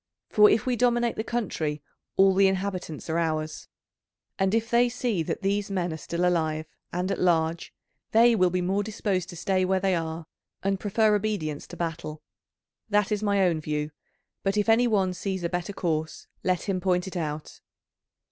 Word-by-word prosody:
For 210 0 +6
if 215 - +2
we 255 -1 +1
dominate 240 0 +2
the 220 - -2
country 160 -11 -2 0.3
all 195 0 +6
the 195 +1 +5
inhabitants 185 -5 -3
are 165 +1 0
ours, 155 -1 -2 0.7
and 195 +2 +2
if 225 0 -1
they 240 +1 +4
see 240 -6 -1
that 160 - -3
these 200 +1 0
men 180 -4 -1
are - - -5
still 170 +2 -2
alive 160 -3 +1 0.3
and 180 +2 -1
at - - -2
large 165 -2 +1 0.4
they 230 +1 +5
will 185 -3 +4
be 180 +1 -1
more 190 +3 +1
disposed 200 -3 -2
to - - -8
stay 185 +2 +1
where 190 +1 +2
they 190 0 +1
are, 165 -1 -3 0.4
and 195 0 0
prefer 215 +2 +2
obedience 200 -8 -2
to 175 - -10
battle. 160 -2 -4 0.7
That 210 0 +2
is 210 -1 0
my 200 -2 +2
own 165 -3 +1
view, 150 0 -2 0.5
but 195 +1 0
if 210 +1 +1
any 235 +2 +5
one 195 -5 +2
sees 190 0 -3
a 170 - 0
better 175 +2 -3
course, 160 -5 -2 0.2
let 185 -2 +1
him 190 -3 -1
point 180 -1 +1
it 190 - -7
out." 155 -3 -4
185 Hz, 185 wpm, -26 LUFS, 165-205 Hz, 0.7 s, For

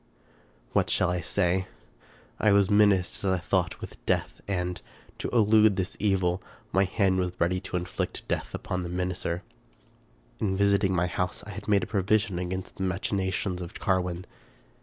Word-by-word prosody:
What - - +2
shall 90 -1 +2
I 90 -1 -1
say? 95 +2 +1 0.7
I 110 - +4
was 100 -1 +4
menaced, 100 -3 +3
as 95 - +2
I 95 - +2
thought, 85 - 0
with - - -10
death, - - 0
and, 90 -2 -2 0.4
to - - -2
elude 110 -2 +5
this 95 0 -2
evil, 95 -3 +1 0.3
my 95 +1 +3
hand 95 0 +2
was 90 -1 -1
ready 90 +2 +2
to 90 - -3
inflict 90 0 -4
death - - -2
upon 90 - -3
the 85 - -4
menacer. 90 0 -2 1.0
In 95 -2 0
visiting 100 -1 +3
my 90 0 +2
house, 90 +2 -2
I 105 - -8
had 95 - -8
made 100 -4 +3
provision 100 -1 +1
against 90 +1 -4
the 95 - -3
machinations 95 -1 -1
of 85 - -7
Carwin. 90 -1 -1
95 Hz, 160 wpm, -28 LUFS, 90-100 Hz, 1.0 s, elude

